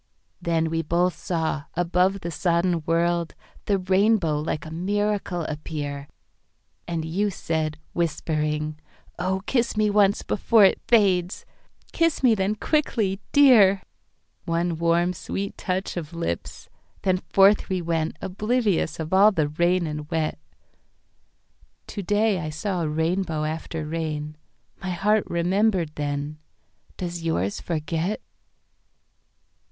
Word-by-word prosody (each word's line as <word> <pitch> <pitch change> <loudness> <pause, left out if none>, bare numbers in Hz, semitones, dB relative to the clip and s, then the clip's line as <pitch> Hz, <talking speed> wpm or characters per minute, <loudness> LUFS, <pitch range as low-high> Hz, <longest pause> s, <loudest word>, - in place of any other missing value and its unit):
Then 165 -1 0
we 165 0 0
both 170 +3 +1
saw, 160 -4 -2
above 180 +3 +1
the 170 - -4
sodden 170 +1 +1
world, 170 0 +1 0.3
The 200 - +2
Rainbow 190 -4 +2
like 150 0 -3
a 155 - -8
miracle 200 0 -1
appear, 145 -2 -5 0.8
And 165 -2 -2
you 195 +6 0
said, 160 -4 -2 0.2
whispering, 155 -2 -1 0.4
"Oh, 190 +2 -1
kiss 240 -2 0
me 210 -1 +3
onceBefore 205 +1 +4
it - - -12
fades!"—"Kiss 205 - 0
me 245 -3 +6
then 200 0 0
quickly, 215 -7 0
Dear!"One 190 - +2
warm 170 +1 +2
sweet 195 +3 -4
touch 185 0 -3
of 170 -2 -6
lips—then 165 - -4
forth 200 +2 +5
we 185 -1 0
wentOblivious 180 +3 -1
of 160 +2 -4
all 200 +3 +7
the 155 -7 0
rain 175 +3 +1
and 150 -1 -5
wet. 160 - -1 1.5
To 205 - -6
day 205 +1 +1
I 155 -1 -4
saw 175 +4 -2
a 155 - -1
rainbow 160 0 -1
after 155 0 -4
rain….My 155 +3 -6
heart 205 +4 +2
remembered 180 0 +1
then—does 150 +4 -6
yours 100 - -1
forget? 165 +4 -2
175 Hz, 110 wpm, -24 LUFS, 160-195 Hz, 1.5 s, all